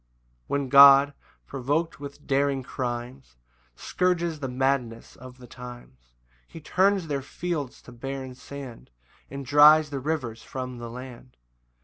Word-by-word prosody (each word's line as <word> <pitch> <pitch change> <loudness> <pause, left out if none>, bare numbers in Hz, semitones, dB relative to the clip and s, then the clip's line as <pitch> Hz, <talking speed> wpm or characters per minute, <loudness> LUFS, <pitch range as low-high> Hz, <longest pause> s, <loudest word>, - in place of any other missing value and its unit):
1 140 - -1
When 135 - -6
God, 140 +1 +8 0.3
provok'd 145 +5 -2
with 145 0 -10
daring 140 -1 0
crimes, 125 - -6 0.4
Scourges 175 - -1
the 135 - -4
madness 125 -3 -2
of 130 +1 -13
the 125 - -13
times, 120 - -13 0.3
He - - -11
turns 190 +4 +1
their 145 -3 -3
fields 150 -1 -5
to - - -13
barren 130 +1 -6
sand, 130 -2 -10 0.4
And 140 0 -7
dries 150 +2 +6
the 140 - -3
rivers 130 -6 -3
from 130 -1 -7
the 120 0 -7
land. 125 +1 -11
135 Hz, 135 wpm, -25 LUFS, 125-145 Hz, 0.4 s, God